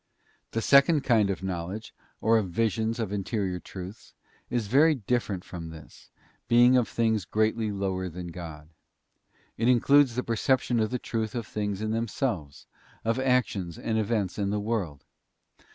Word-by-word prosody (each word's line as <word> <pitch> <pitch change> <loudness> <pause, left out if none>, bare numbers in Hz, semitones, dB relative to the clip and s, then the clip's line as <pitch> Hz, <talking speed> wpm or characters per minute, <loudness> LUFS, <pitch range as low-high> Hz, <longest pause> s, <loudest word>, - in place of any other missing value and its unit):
The 115 - -2
second 140 +2 +5
kind 110 -5 +3
of 95 -1 -3
knowledge, 95 +3 -4 0.3
or 115 +1 +4
of 100 -4 -3
visions 110 +4 0
of 105 -3 -2
interior 100 -2 -2
truths, 95 +4 -10 0.3
is 120 -3 -1
very 150 +9 +4
different 110 -6 -2
from 85 -2 -8
this, 80 -2 -13 0.4
being 120 +2 +6
of 125 -3 +3
things 110 -3 +1
greatly 110 +3 0
lower 95 -2 -2
than 90 +1 -7
God. 80 -3 -9 0.9
It 115 - +2
includes 125 +1 +5
the 125 - -1
perception 120 +1 +1
of 110 -1 +1
the 125 - -1
truth 110 -2 -3
of 120 -2 -3
things 105 -1 -3
in 110 - -1
themselves, 110 - -2 0.4
of 115 +3 +1
actions 125 -10 0
and 110 -1 -1
events 105 -3 -1
in 100 -1 0
the 105 +1 0
world. 100 -10 -3
110 Hz, 155 wpm, -27 LUFS, 95-120 Hz, 0.9 s, being